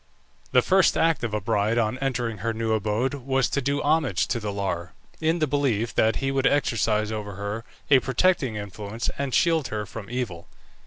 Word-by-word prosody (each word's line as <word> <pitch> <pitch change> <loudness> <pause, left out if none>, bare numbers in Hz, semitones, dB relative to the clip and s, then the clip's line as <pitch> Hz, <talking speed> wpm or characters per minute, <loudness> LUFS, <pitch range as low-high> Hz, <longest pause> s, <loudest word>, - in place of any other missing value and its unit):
The 125 -1 +5
first 190 0 +4
act 165 -5 +2
of 115 - -1
a 105 - -1
bride 105 +3 0
on 115 +2 0
entering 120 -5 -2
her 115 +3 -1
new 110 0 0
abode 110 +5 0
was 135 -1 0
to 140 - 0
do 140 +2 -1
homage 145 - +2
to 120 - 0
the 105 -2 -3
Lar, 90 -3 -3 0.3
in 160 +1 +1
the 155 - +2
belief 130 -6 0
that 110 +1 +3
he 135 0 -1
would 135 0 +2
exercise 110 -6 +1
over 105 -2 -4
her 100 +3 -4 0.3
a 135 - +8
protecting 130 -2 +1
influence 105 +2 -4
and 140 -1 -1
shield 165 -1 +2
her 105 -1 -3
from 105 0 -9
evil. 115 -9 -4
115 Hz, 195 wpm, -25 LUFS, 105-135 Hz, 0.3 s, a